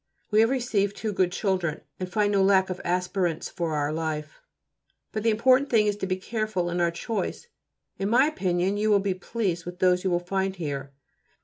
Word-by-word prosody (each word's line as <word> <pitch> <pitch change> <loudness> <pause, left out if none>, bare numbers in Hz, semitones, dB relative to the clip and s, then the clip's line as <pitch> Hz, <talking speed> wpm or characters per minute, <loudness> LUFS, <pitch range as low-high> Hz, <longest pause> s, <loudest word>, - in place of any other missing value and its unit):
We 210 - +4
have 225 +1 +5
received 225 -6 0
two 215 -2 -3
good 185 -2 +2
children, 185 -5 -1 0.2
and 185 -1 -4
find 210 0 +2
no 200 -1 +3
lack 190 -1 +4
of 185 - -5
aspirants 180 -1 -1
for 165 -3 -2
our 145 0 0
life, 155 - -4 0.7
but 215 - -3
the 225 - +2
important 255 +5 +4
thing 220 -3 +4
is 205 -1 +1
to 190 - -3
be 185 - 0
careful 215 -3 -2
in 175 0 -1
our 170 - +3
choice. 220 - -4 0.5
In 195 +1 -1
my 250 +5 +5
opinion 190 - 0
you 215 +1 +1
will 205 - +6
be 195 -1 0
pleased 185 -2 -2
with 175 +1 -7
those 180 -1 +3
you 190 - +1
will 175 -1 +2
find 190 +2 -2
here. 140 -5 -4
190 Hz, 205 wpm, -26 LUFS, 175-215 Hz, 0.7 s, will